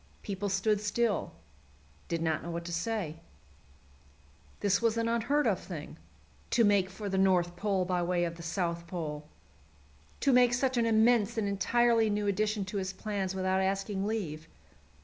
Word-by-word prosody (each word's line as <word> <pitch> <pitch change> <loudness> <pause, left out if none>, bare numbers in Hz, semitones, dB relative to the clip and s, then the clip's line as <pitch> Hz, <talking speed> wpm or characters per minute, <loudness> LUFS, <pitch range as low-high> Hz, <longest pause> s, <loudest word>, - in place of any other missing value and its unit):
People 200 -1 -3
stood 200 +2 +1
still 215 0 0 0.8
did 165 -1 -2
not 160 -1 0
know 170 - -7
what 170 0 -4
to 170 - -5
say. 170 -3 -2 1.4
This 200 +1 +2
was 230 -1 +2
an 230 0 +1
unheard 235 +6 +1
of - - +2
thing, - - -8 0.5
to 235 - +3
make 200 -3 +3
for 205 +2 -7
the 190 -1 0
North 180 -2 +3
Pole 195 -1 0
by 180 -1 0
way 175 0 +1
of 170 -1 -2
the 170 - -10
South 170 0 -2
Pole! 150 -4 -5 0.9
To 275 - +3
make 245 -1 +5
such 260 +1 0
an 235 -1 +2
immense 225 0 +3
and 215 -2 0
entirely 230 +3 +2
new 205 0 0
addition 210 0 0
to 195 +2 -4
his 190 -1 -3
plans 195 -2 -3
without 190 0 +1
asking 195 +1 -1
leave! 165 -8 -3
195 Hz, 170 wpm, -30 LUFS, 180-220 Hz, 1.4 s, make